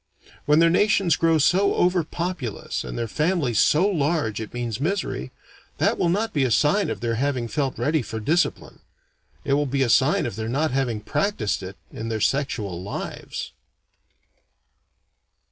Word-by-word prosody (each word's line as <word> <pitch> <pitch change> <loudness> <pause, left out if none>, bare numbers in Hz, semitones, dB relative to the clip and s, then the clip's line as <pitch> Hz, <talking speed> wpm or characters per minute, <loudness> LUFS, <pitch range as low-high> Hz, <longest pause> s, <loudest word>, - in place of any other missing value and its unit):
When 150 +1 +5
their 165 0 +5
nations 195 -3 +3
grow 165 -1 +3
so 185 +7 +3
over 180 -1 +2
populous 170 - -4
and - - -6
their 115 -1 -2
families 150 - 0
so 170 +6 +4
large 150 - 0
it 110 - -7
means 120 -1 -4
misery, 195 +7 -2 0.5
that - - +1
will 175 - +2
not 215 +5 0
be 145 - +2
a 130 - +1
sign 150 - +2
of - - -4
their 115 -1 -1
having 135 -4 0
felt 135 +1 -2
ready 150 +6 +1
for 110 0 -5
discipline. 160 +11 -1 0.7
It 140 - +1
will 145 +1 +2
be 135 +1 +1
a 125 - 0
sign 135 +5 +3
of 115 -4 -5
their 110 0 -3
not 150 +5 0
having 125 -5 -1
practised 160 - -1
it 95 +1 -8
in 115 - -6
their 110 -1 -2
sexual 110 -8 -1
lives. 100 - -6
140 Hz, 165 wpm, -24 LUFS, 115-170 Hz, 0.7 s, When